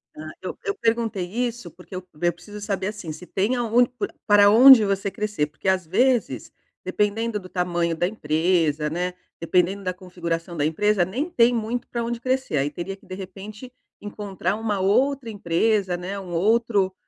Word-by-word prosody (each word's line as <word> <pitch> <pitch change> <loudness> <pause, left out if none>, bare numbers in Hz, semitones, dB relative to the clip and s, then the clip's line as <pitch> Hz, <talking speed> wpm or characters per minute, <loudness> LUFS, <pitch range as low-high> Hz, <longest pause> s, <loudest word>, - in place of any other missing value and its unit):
Ah, 155 0 -8
eu 185 - -6
eu 405 - -1
perguntei 225 -4 0
isso, 240 +5 -3
porque 180 +1 -12
eu 185 - -5 0.2
eu 175 0 +2
preciso 205 +5 -11
saber, 195 -2 -2
assim, 205 -6 -6
se 165 +4 -9
tem 205 +8 0
aon 240 0 +3
p 245 0 -5 0.2
para 205 -1 +6
onde 250 +2 +9
você 195 0 -1
crescer. 210 -9 -2
Porque 155 +5 -9
às 185 -2 +1
vezes, 245 +8 +1 0.3
dependendo 210 +1 0
do 185 -2 -12
tamanho 175 -2 -1
da 175 +2 0
empresa, 160 -4 0
né, 180 +3 -2 0.3
dependendo 180 +4 +1
da 185 -1 -2
configuração 170 -1 -5
da 145 - +1
empresa, 195 +4 +2
nem 265 - -3
tem 240 -5 +4
muito 230 +1 -2
pra 235 -1 -3
onde 235 0 -3
crescer. 260 - -1
Aí 140 +2 +1
teria 185 +4 -5
que, 195 - -23
de 185 - -7
repente, 205 +6 -9 0.3
encontrar 205 -2 -3
uma 215 -3 -2
outra 255 +6 +1
empresa, 195 0 0
né, 190 +3 -5
um 180 -2 -9
outro, 205 +1 +2
200 Hz, 180 wpm, -23 LUFS, 180-225 Hz, 0.3 s, onde